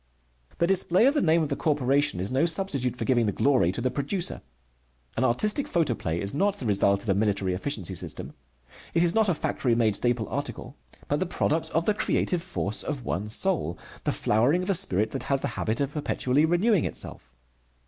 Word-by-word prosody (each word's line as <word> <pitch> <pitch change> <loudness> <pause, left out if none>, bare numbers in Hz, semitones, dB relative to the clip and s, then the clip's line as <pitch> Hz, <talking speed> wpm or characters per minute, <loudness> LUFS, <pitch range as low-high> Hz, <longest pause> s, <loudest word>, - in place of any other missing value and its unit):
The 170 - +2
display 185 +2 +3
of 275 - +4
the 295 - +1
name 160 0 +3
of 150 - -3
the 140 - -1
corporation 140 - +1
is 95 +5 -2
no 135 +6 +2
substitute 150 -8 -1
for - - -4
giving 120 -4 +2
the - - +1
glory 125 -8 +2
to 110 - -5
the 130 +1 0
producer. 170 +6 -2 0.7
An 120 - 0
artistic 210 - +1
photoplay 120 - -1
is 100 +1 -2
not 195 +7 +1
the 130 - -6
result 100 -1 +2
of 110 - -6
a - - +4
military 100 -2 0
efficiency 95 - -3
system. 90 - -4 0.6
It 170 - +4
is 175 -1 +2
not 220 -2 +3
a 175 - +2
factory 125 -5 0
made 110 -3 +2
staple 120 -1 +1
article, 140 -1 -5 0.3
but 145 - 0
the 185 - -1
product 160 -2 -1
of 165 +1 0
the 210 - +3
creative 180 -3 0
force 160 - -2
of 140 -5 -4
one 100 +4 -3
soul, 110 - 0 0.3
the - - 0
flowering 130 +12 +2
of 190 - 0
a - - +3
spirit 110 - +1
that 135 -2 -5
has 135 -1 +1
the - - -2
habit 110 +1 -2
of 140 0 -1
perpetually 145 -1 +1
renewing 175 +3 +2
itself. 60 0 -4
140 Hz, 205 wpm, -26 LUFS, 110-170 Hz, 0.7 s, of